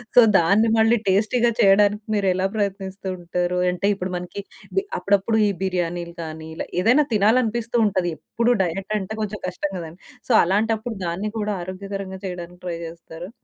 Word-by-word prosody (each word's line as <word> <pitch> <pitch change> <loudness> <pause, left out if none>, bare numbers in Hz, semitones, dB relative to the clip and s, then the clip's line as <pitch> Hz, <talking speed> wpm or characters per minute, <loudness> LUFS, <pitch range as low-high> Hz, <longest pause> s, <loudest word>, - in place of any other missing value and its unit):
So - - +10 0.2
దాన్ని 200 +7 +4
మళ్ళీ 225 +2 +4
టేస్టీ‌గా 220 +5 +3
చేయడానికి 205 +1 +4
మీరెలా 190 -2 +1
ప్రయత్నిస్తూ 195 -2 -3
ఉంటారు? 175 +1 -2
అంటే 180 +2 -3
ఇప్పుడు 185 -2 -4
మనకి 180 +3 -6 0.3
బి 390 - +2 0.2
అప్పుడప్పుడు 200 +3 +2
ఈ - - +2
బిర్యానీలు 175 -2 -2
కానీ 160 0 -7
ఇలా - - -5
ఏదైనా 250 +9 +4
తినాలి 215 +4 +4
అనిపిస్తూ 235 +1 -1
ఉంటది. 185 -4 0
ఎప్పుడు 235 +8 0
డైట్ 190 +3 -4
అంటే 195 +2 -5
కొంచెం 210 -1 -4
కష్టం 185 +2 -3
కదా! 165 -2 -6 0.4
సో - - +4
అలాంటప్పుడు 220 +4 0
దాన్ని 190 +5 -3
కూడా 210 0 -1
ఆరోగ్యకరంగా 190 +1 -6
చేయడానికి 180 -1 -7
ట్రై 170 -1 -3
చేస్తారా? 165 +1 -10
195 Hz, 155 wpm, -23 LUFS, 180-215 Hz, 0.4 s, సో